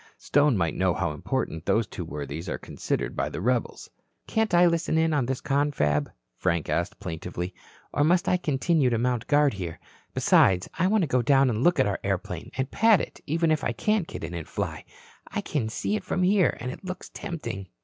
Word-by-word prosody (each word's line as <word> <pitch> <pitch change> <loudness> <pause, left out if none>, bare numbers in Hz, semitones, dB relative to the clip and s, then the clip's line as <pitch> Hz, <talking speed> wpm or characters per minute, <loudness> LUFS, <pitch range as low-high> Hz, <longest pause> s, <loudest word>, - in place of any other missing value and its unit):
Stone 145 -4 +3
might 85 -3 0
know 95 -2 +1
how 85 -4 -1
important 80 +2 -3
those 115 0 +3
two 95 - -6
worthies 75 0 -6
are - - -2
considered - - -3
by - - -1
the - - -5
rebels." 120 +3 -1 0.4
"Can't 220 -1 0
I 175 0 +6
listen 170 -2 +1
in 160 0 +2
on 135 -5 +1
this 130 -1 -2
confab?" 135 - +1 0.3
Frank 85 -4 0
asked, 100 +5 -1
plaintively. 90 0 -5 0.4
"Or 145 - +2
must 175 +3 +3
I 180 - +3
continue 150 -3 +1
to 120 - +1
mount 120 -1 0
guard 145 -2 +4
here? 90 -5 -5 0.4
Besides, 90 -1 +4
I 180 - +4
want 210 0 +3
to - - 0
go 130 -1 +2
down 135 +1 +4
and 110 +2 -1
look 175 -2 +4
at 130 - +5
our 100 -1 -1
airplane, - - -3
and 130 +1 -2
pat 225 -2 +5
it - - -6
even 165 +2 +1
if 155 -2 +1
I 120 - 0
can't 210 - 0
get - - -7
in - - -5
and 85 -2 -5
fly. - - -4 0.4
I - - -3
can 125 -8 -2
see 165 - -1
it - - -3
from 185 - -1
here, 190 0 +3
and 125 +2 -4
it 140 - -10
looks 185 0 -6
tempting." 100 - -6
130 Hz, 210 wpm, -26 LUFS, -, 0.4 s, I